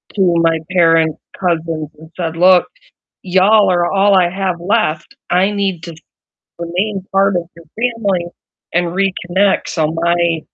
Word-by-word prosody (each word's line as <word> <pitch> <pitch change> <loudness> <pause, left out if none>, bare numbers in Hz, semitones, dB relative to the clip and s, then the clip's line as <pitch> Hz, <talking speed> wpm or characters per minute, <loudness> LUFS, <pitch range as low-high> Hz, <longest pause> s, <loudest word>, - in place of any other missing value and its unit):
to 185 -4 +2
my 165 -1 +2
parents' 165 -3 +3 0.2
cousins 165 -4 -2
and 160 0 -14
said, 165 -2 -3
"Look, 180 0 +5 0.6
y'all 190 +2 +3
are 175 -1 +1
all 200 0 +3
I 180 -2 +3
have 190 -1 -2
left. 175 -6 -1 0.2
I 185 +3 +2
need 195 -5 -2
to 170 -2 -8 0.6
remain 185 +3 -3
part 195 -1 +2
of 175 - 0
your 170 -1 -16
family 220 -7 -1 0.5
and 175 0 +1
reconnect." 190 +1 0
So, 160 -2 -1
my 170 0 0
180 Hz, 140 wpm, -16 LUFS, 170-195 Hz, 0.6 s, Look